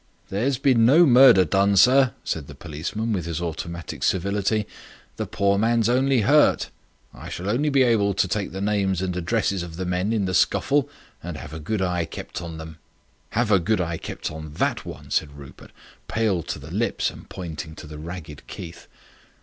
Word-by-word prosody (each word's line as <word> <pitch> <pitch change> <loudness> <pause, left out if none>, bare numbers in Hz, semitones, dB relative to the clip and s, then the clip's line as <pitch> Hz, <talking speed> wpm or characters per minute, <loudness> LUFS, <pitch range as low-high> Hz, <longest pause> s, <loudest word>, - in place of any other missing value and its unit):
"There's 125 +7 0
been 130 -4 +3
no 150 +9 +7
murder 125 - +7
done, 100 +4 +2
sir," 130 +3 +5
said 75 -4 -3
the 70 - -11
policeman, 85 +10 -4
with 90 -5 -2
his 85 -2 -3
automatic 85 0 -5
civility. 100 +3 0 0.5
"The - - -3
poor 100 0 +1
man's 115 0 +2
only 130 0 +3
hurt. 145 +8 +4 0.4
I - - -10
shall 90 - -5
only 130 +9 +1
be 135 -2 +4
able 105 -5 +2
to 95 - +2
take 100 +1 -2
the 95 - -5
names 100 -3 0
and 90 -1 -2
addresses 95 +1 0
of 85 -2 -7
the 95 +2 -4
men 90 +4 -1
in 110 -4 0
the 95 - -2
scuffle 140 +9 +2 0.3
and 85 -2 -6
have 75 0 -9
a 80 - -6
good 95 +6 -2
eye 90 -2 0
kept - - -7
on 85 -2 -7
them." 80 -1 -9 0.6
"Have 120 -2 +2
a 100 - +6
good 105 +5 0
eye 85 -2 -2
kept - - -5
on 80 -1 -8
that - - -1
one," - - -9
said 75 -2 -1
Rupert, 70 -2 -13 0.4
pale 110 -6 0
to - - -5
the - - -11
lips, - - 0
and - - -14
pointing 80 -3 -7
to - - -10
the 75 0 -9
ragged 80 -2 -9
Keith. 85 -2 -9
95 Hz, 195 wpm, -24 LUFS, 85-115 Hz, 0.6 s, no